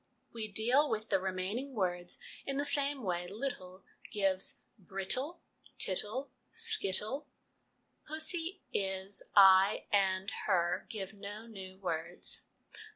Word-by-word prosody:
We 225 Hz, -2 st, -3 dB
deal 250 Hz, +8 st, +3 dB
with 220 Hz, 0 st, -2 dB
the 195 Hz, -, +4 dB
remaining 190 Hz, +9 st, -3 dB
words 175 Hz, -3 st, -1 dB, 0.3 s
in 275 Hz, 0 st, -3 dB
the 285 Hz, -, 0 dB
same 285 Hz, -2 st, +1 dB
way 175 Hz, -2 st, -1 dB
'little' 190 Hz, -4 st, -5 dB, 0.3 s
gives 195 Hz, -2 st, +1 dB, 0.2 s
brittle, 230 Hz, -, +1 dB, 0.4 s
tittle, 215 Hz, +8 st, +1 dB, 0.2 s
skittle: 295 Hz, -, +1 dB, 0.8 s
pussy, 325 Hz, +4 st, 0 dB
is, 190 Hz, 0 st, -1 dB
I, 195 Hz, 0 st, +7 dB
and 190 Hz, -1 st, +2 dB, 0.2 s
her, 175 Hz, -4 st, +1 dB
give 200 Hz, -2 st, -5 dB
no 205 Hz, +2 st, -8 dB
new 190 Hz, -4 st, -9 dB
words. 175 Hz, -2 st, -2 dB
200 Hz, 110 wpm, -33 LUFS, 190-270 Hz, 0.8 s, I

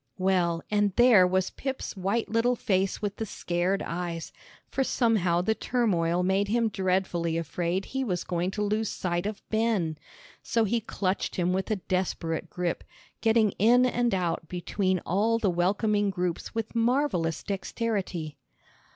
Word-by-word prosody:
Well, 180 Hz, -3 st, +1 dB
and 205 Hz, -2 st, +2 dB
there 240 Hz, -7 st, +7 dB
was 185 Hz, 0 st, 0 dB
Pip's 270 Hz, -4 st, -4 dB
white 200 Hz, +4 st, -1 dB
little 230 Hz, +3 st, +2 dB
face 195 Hz, -2 st, 0 dB
with 205 Hz, -1 st, -2 dB
the 220 Hz, -, -2 dB
scared 180 Hz, +2 st, -1 dB
eyes, 170 Hz, -1 st, -4 dB, 0.4 s
for 270 Hz, -, 0 dB
somehow 205 Hz, -10 st, +2 dB
the 220 Hz, -, +2 dB
turmoil 180 Hz, -9 st, +1 dB
made 190 Hz, +2 st, +2 dB
him 230 Hz, +1 st, +2 dB
dreadfully 185 Hz, -4 st, 0 dB
afraid 175 Hz, +3 st, -2 dB
he 265 Hz, 0 st, -2 dB
was 180 Hz, -8 st, -2 dB
going 175 Hz, +1 st, -1 dB
to 210 Hz, -, +1 dB
lose 215 Hz, +1 st, 0 dB
sight 175 Hz, +1 st, -2 dB
of 210 Hz, -1 st, -7 dB
Ben. 215 Hz, -9 st, 0 dB, 0.4 s
So 230 Hz, -, +1 dB
he 230 Hz, +2 st, 0 dB
clutched 195 Hz, -3 st, -2 dB
him 180 Hz, 0 st, +1 dB
with 190 Hz, +3 st, -1 dB
a 215 Hz, -, +2 dB
desperate 180 Hz, -3 st, -2 dB
grip, 175 Hz, -1 st, -2 dB, 0.4 s
getting 220 Hz, -2 st, +4 dB
in 240 Hz, +5 st, +5 dB
and 240 Hz, -1 st, +1 dB
out 170 Hz, -3 st, -1 dB
between 185 Hz, +2 st, -1 dB
all 215 Hz, +5 st, +2 dB
the 210 Hz, -5 st, +1 dB
welcoming 205 Hz, +4 st, +1 dB
groups 180 Hz, -1 st, -3 dB
with 225 Hz, -1 st, -3 dB
marvellous 230 Hz, -, +1 dB
dexterity. 195 Hz, -6 st, -3 dB
195 Hz, 150 wpm, -27 LUFS, 175-225 Hz, 0.4 s, there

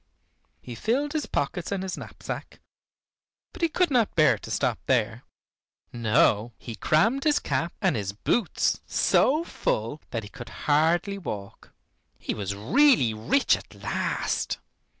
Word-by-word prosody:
He 125 Hz, -, -7 dB
filled 265 Hz, -, -1 dB
his 310 Hz, -2 st, -2 dB
pockets 165 Hz, +6 st, -2 dB
and 195 Hz, -2 st, -1 dB
his 190 Hz, -, -3 dB
knapsack, -, -, -8 dB, 0.9 s
but -, -, -11 dB
he 335 Hz, -, +3 dB
could 355 Hz, 0 st, +1 dB
not 240 Hz, -5 st, +2 dB
bear 155 Hz, -3 st, +4 dB
to -, -, -10 dB
stop -, -, 0 dB
there. 120 Hz, -2 st, +1 dB, 0.7 s
No, 115 Hz, -1 st, +2 dB
he 115 Hz, -, -8 dB
crammed 220 Hz, -, +2 dB
his 300 Hz, -2 st, +3 dB
cap 165 Hz, +1 st, -1 dB
and 185 Hz, -7 st, +3 dB
his 100 Hz, -3 st, -2 dB
boots 175 Hz, -, 0 dB
so 305 Hz, +5 st, +3 dB
full 115 Hz, -, -2 dB
that 115 Hz, -3 st, -3 dB
he 105 Hz, -, -9 dB
could 120 Hz, +1 st, -10 dB, 0.2 s
hardly 170 Hz, +7 st, +2 dB
walk. 100 Hz, -, -7 dB, 0.5 s
He -, -, -3 dB
was 100 Hz, -1 st, -4 dB
really 130 Hz, -, +4 dB
rich 110 Hz, -, +2 dB
at -, -, -12 dB
last. -, -, -2 dB
155 Hz, 145 wpm, -26 LUFS, -, 0.9 s, bear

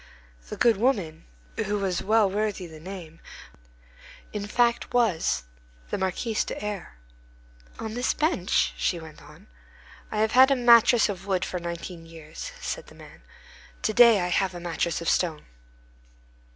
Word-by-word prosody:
The -, -, -6 dB
good 230 Hz, -4 st, +4 dB
woman, 200 Hz, -9 st, -1 dB, 0.3 s
who 205 Hz, +1 st, -1 dB
was 190 Hz, -3 st, -1 dB
well 215 Hz, +1 st, +3 dB
worthy 205 Hz, -1 st, -2 dB
the 160 Hz, -2 st, -11 dB
name, 165 Hz, -2 st, -9 dB, 1.1 s
in 205 Hz, -1 st, -4 dB
fact, 235 Hz, +2 st, +1 dB
was 170 Hz, -, +1 dB, 0.5 s
the -, -, 0 dB
Marquise 210 Hz, +4 st, -1 dB
de -, -, -6 dB
R—— 205 Hz, -, -6 dB, 0.8 s
"On 220 Hz, -1 st, -5 dB
this 245 Hz, +2 st, 0 dB
bench?" 300 Hz, -, +1 dB
she 175 Hz, -, -1 dB
went 160 Hz, -2 st, -12 dB
on. 150 Hz, +7 st, -16 dB, 0.7 s
"I 215 Hz, -, -3 dB
have 220 Hz, 0 st, +2 dB
had 260 Hz, +2 st, +7 dB
a 275 Hz, -, +4 dB
mattress 240 Hz, -1 st, +6 dB
of 195 Hz, -1 st, -6 dB
wood 185 Hz, -2 st, 0 dB
for 180 Hz, -, -4 dB
nineteen 170 Hz, 0 st, -7 dB
years," 165 Hz, -, -9 dB
said -, -, -5 dB
the -, -, -15 dB
man; -, -, -15 dB, 0.6 s
"to 215 Hz, -, 0 dB
day 235 Hz, -3 st, +7 dB
I 180 Hz, -, -1 dB
have 185 Hz, 0 st, 0 dB
a -, -, -6 dB
mattress 170 Hz, -1 st, -2 dB
of 170 Hz, -, -5 dB
stone." 160 Hz, -4 st, 0 dB
195 Hz, 155 wpm, -26 LUFS, 170-225 Hz, 1.1 s, had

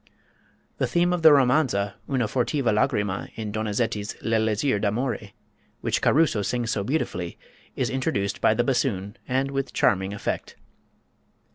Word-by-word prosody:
The -, -, +1 dB
theme 175 Hz, +1 st, +2 dB
of 175 Hz, -, -1 dB
the 160 Hz, -1 st, +8 dB
romanza, 125 Hz, -7 st, +3 dB, 0.2 s
"Una 130 Hz, -4 st, +1 dB
fortiva 125 Hz, +1 st, 0 dB
lagrima," 105 Hz, -2 st, 0 dB
in 110 Hz, -2 st, -4 dB
Donizetti's 105 Hz, 0 st, -2 dB
"L'Elisir 110 Hz, +1 st, +1 dB
d'Amore," 110 Hz, 0 st, -2 dB, 0.5 s
which -, -, 0 dB
Caruso 150 Hz, -8 st, +3 dB
sings 120 Hz, +3 st, -1 dB
so 100 Hz, -, -1 dB
beautifully, 95 Hz, -, -2 dB, 0.4 s
is -, -, -1 dB
introduced 130 Hz, -8 st, -1 dB
by 110 Hz, -, +4 dB
the 120 Hz, -, +2 dB
bassoon, 115 Hz, -6 st, -1 dB
and 135 Hz, +2 st, 0 dB
with 135 Hz, 0 st, -3 dB
charming 95 Hz, 0 st, +2 dB
effect. 100 Hz, -, -4 dB
115 Hz, 135 wpm, -25 LUFS, 105-135 Hz, 0.5 s, the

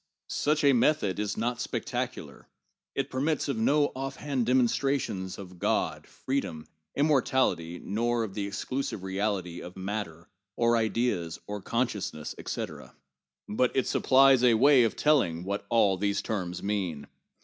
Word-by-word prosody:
Such 150 Hz, +1 st, +1 dB
a 140 Hz, -1 st, +6 dB
method 120 Hz, -6 st, +2 dB
is 105 Hz, -1 st, -2 dB
not 120 Hz, +2 st, -1 dB
spectacular; -, -, -4 dB, 0.5 s
it 135 Hz, 0 st, -2 dB
permits 145 Hz, +4 st, 0 dB
of 140 Hz, -, -1 dB
no 145 Hz, +6 st, +3 dB
offhand 135 Hz, -1 st, -3 dB
dem 130 Hz, +1 st, +4 dB
onstrations 115 Hz, -8 st, -1 dB
of 90 Hz, -3 st, -10 dB
God, -, -, -1 dB
freedom, 90 Hz, -, -3 dB, 0.3 s
immortality, 130 Hz, -, +1 dB
nor 115 Hz, +5 st, -1 dB
of 105 Hz, -4 st, -5 dB
the 100 Hz, -1 st, -3 dB
exclusive 105 Hz, +1 st, -3 dB
reality 95 Hz, -3 st, -2 dB
of 90 Hz, +1 st, -10 dB
matter, 95 Hz, -4 st, -5 dB, 0.3 s
or 120 Hz, 0 st, +3 dB
ideas, 110 Hz, -7 st, 0 dB
or 105 Hz, 0 st, -5 dB
consciousness, 105 Hz, -10 st, -2 dB
etc. -, -, -6 dB, 0.5 s
But 125 Hz, +4 st, +1 dB
it 130 Hz, -, +2 dB
supplies 135 Hz, -1 st, +5 dB
a 120 Hz, -2 st, +6 dB
way 130 Hz, +1 st, +6 dB
of 110 Hz, -, -1 dB
telling 110 Hz, -, +2 dB
what 100 Hz, +2 st, -4 dB
all 105 Hz, -5 st, +3 dB
these 100 Hz, +1 st, 0 dB
terms 90 Hz, -5 st, -3 dB
mean. 95 Hz, -8 st, -2 dB
110 Hz, 140 wpm, -28 LUFS, 95-130 Hz, 0.5 s, a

